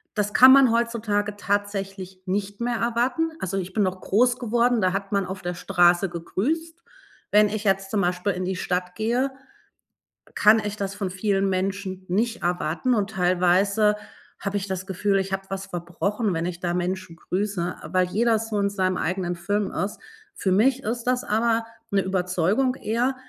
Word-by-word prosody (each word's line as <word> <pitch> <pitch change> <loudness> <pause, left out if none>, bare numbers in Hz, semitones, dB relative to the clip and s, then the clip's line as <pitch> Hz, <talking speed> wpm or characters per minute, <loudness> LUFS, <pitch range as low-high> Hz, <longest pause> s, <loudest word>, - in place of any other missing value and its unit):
Das 210 -1 -1
kann 255 +1 +9
man 270 -4 +6
heutzutage 215 -3 0
tatsächlich 195 -2 -3
nicht 200 +3 -3
mehr 240 0 0
erwarten. 245 +8 0
Also, 190 +1 -3
ich 185 0 -4
bin 210 - +2
noch 185 0 -2
groß 245 +5 +2
geworden, 240 0 +2
da 185 -1 +2
hat 195 0 -3
man 200 -1 +1
auf 190 0 -6
der 175 0 -2
Straße 175 +2 +3
gegrüßt. 315 - -3 0.5
Wenn 210 0 +6
ich 215 0 -3
jetzt 195 -1 +1
zum 210 -3 +1
Beispiel 180 +2 0
in 185 0 -3
die 190 - -2
Stadt 180 0 -2
gehe, 240 +6 0 1.1
kann 220 0 +6
ich 210 0 -4
das 195 -1 -3
von 195 -2 -3
vielen 195 0 0
Menschen 190 0 -2
nicht 225 +5 0
erwarten 175 +7 0
und 205 -1 0
teilweise 190 +3 +3 0.4
habe 200 0 -3
ich 200 0 -4
das 185 -1 -4
Gefühl, 195 +1 +1
ich 190 0 -3
habe 195 - -2
was 195 0 -4
verbrochen, 195 +5 -2
wenn 165 +1 -1
ich 175 -1 -4
da 175 -1 -1
Menschen 180 -1 -3
grüße, 185 -1 -2
äh, - - -6
weil 185 0 +4
jeder 225 +4 +2
so 215 -2 -2
in 200 - +2
seinem 185 -2 0
eigenen 180 0 -2
Film 205 +3 -1
ist. 200 +3 -3 0.4
Für 190 - -1
mich 250 +8 +3
ist 235 +2 -2
das 250 0 +1
aber 225 +1 +1 0.3
'ne 200 -1 +3
Überzeugung 190 +7 +1
eher 245 +2 -1
200 Hz, 180 wpm, -24 LUFS, 185-220 Hz, 1.1 s, kann